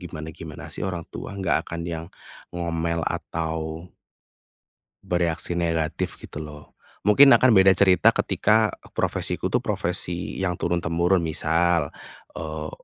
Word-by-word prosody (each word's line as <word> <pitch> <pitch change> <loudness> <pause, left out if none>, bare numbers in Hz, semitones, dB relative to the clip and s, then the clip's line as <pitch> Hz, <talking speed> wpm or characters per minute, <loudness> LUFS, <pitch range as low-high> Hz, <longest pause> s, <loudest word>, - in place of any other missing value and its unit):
gimana-gimana 80 -3 -8
sih - - -7
orang 85 -3 -4
tua, - - -7
nggak 95 -3 0
akan 85 0 -4
yang 85 -1 -5 0.5
ngomel 85 -1 -1
atau 80 0 -3 1.2
bereaksi 85 0 -1
negatif 80 -2 -1
gitu - - -10
loh. 75 -1 -10 0.2
Mungkin 135 +8 +7
akan 125 -5 +5
beda 95 0 +7
cerita 95 -1 +5
ketika, 110 +1 +2 0.2
profesiku - - -1
tuh - - +2
profesi 90 0 -3
yang 95 -2 0
turun-temurun, 85 +1 +1
misal, 80 0 +1 0.5
eee, 80 -1 -5
85 Hz, 115 wpm, -24 LUFS, 80-90 Hz, 1.2 s, Mungkin